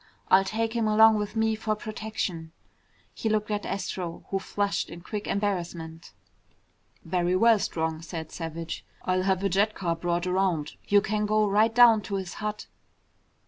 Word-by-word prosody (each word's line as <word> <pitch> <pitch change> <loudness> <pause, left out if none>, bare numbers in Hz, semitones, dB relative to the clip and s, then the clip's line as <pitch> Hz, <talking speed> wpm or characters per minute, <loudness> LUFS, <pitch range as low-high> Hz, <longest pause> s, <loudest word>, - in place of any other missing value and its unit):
I'll 190 +1 +6
take 225 +3 -2
him 230 -2 0
along 220 +1 +6
with 210 +1 -4
me 220 0 +2
for 215 0 -1
protection." 210 -7 -5 0.6
He 220 - -2
looked 215 0 0
at 205 -1 -2
Astro, 180 -3 -4
who 195 - +1
flushed 200 +1 -2
in 170 - -9
quick 205 +3 -5
embarrassment. 170 - -3 0.9
"Very 175 +1 +1
well, 225 +2 +5
Strong," 160 -3 -2
said 165 -1 -7
Savage. 165 0 -5 0.2
"I'll 185 0 +1
have 190 0 0
a - - +3
jet 205 +4 +2
car 170 -3 -1
brought 175 +1 -1
around. 180 -5 0 0.2
You 205 0 +5
can 210 +1 -1
go 215 0 +3
right 210 +3 +4
down 235 -3 +7
to 200 0 -4
his 190 -2 -4
hut." 210 0 -3
195 Hz, 165 wpm, -27 LUFS, 175-215 Hz, 0.9 s, down